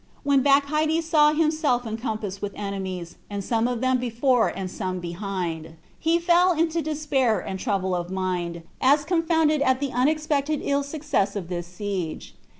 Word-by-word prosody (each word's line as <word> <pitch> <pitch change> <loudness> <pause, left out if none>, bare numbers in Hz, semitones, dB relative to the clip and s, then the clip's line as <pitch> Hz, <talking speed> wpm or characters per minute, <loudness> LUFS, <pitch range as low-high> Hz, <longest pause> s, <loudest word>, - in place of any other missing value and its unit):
And - - -31
when 280 -1 +4
Bacchides 305 +4 +2
saw 300 -2 +5
himself 305 -5 +1
encompassed 215 -3 -4
with 205 -1 -4
enemies, 190 -4 -5
and 200 -1 -4
some 230 +3 +1
of 245 -2 -2
them 260 0 +2
before 245 0 +2
and 190 -2 -4
some 185 -2 -3
behind 175 -2 -4
him, 160 0 -14 0.2
he 325 +1 +2
fell 350 +1 +4
into 330 0 0
despair 290 -7 +1
and 190 - -5
trouble 190 -1 -1
of 175 0 -3
mind, 180 -3 -3 0.2
as 290 +3 +4
confounded 320 -3 +2
at 260 -2 +3
the 280 -1 -2
unexpected 300 +2 +1
ill 280 0 +1
success 280 -9 -1
of 185 -4 -5
this 175 -1 -4
siege. 180 -3 -5
250 Hz, 165 wpm, -25 LUFS, 190-300 Hz, 0.2 s, saw